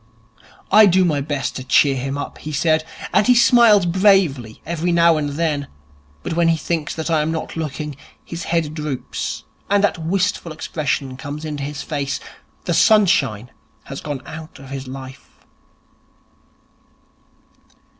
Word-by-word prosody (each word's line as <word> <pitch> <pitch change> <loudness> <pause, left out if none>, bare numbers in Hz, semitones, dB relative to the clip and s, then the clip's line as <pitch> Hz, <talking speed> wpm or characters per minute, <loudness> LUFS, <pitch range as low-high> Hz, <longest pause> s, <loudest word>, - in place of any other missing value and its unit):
'I 210 +1 +8
do 185 0 +4
my 150 -4 +1
best 145 -1 -3
to 130 - -6
cheer 135 +2 +4
him 135 +2 -3
up,' 145 - -6
he 155 - -7
said, 155 +2 +2 0.3
'and 210 - +3
he 250 - +6
smiles 235 -5 +6
bravely 175 - +2
every 170 +1 -1
now 170 -1 +5
and 150 -2 -1
then. 150 -3 -1 0.6
But - - -3
when 170 0 +2
he 165 -1 +3
thinks 160 0 -3
I 160 -2 +2
am 155 +1 -1
not 160 - -4
looking, 150 -2 -4 0.3
his 170 -1 -6
head 165 -3 -1
droops 150 -4 -4 0.3
and 200 0 +3
that 205 - +1
wistful 180 0 -1
expression 140 -4 -3
comes 145 +3 -6
into 150 -2 -4
his 145 +1 -5
face. 140 -3 -3 0.5
The - - 0
sunshine 170 - +3 0.3
has 135 - -8
gone 145 -4 -5
out 160 +1 -9
of 135 -1 -12
his 135 -1 -6
life.' 130 +1 -11
155 Hz, 150 wpm, -20 LUFS, 140-170 Hz, 0.6 s, I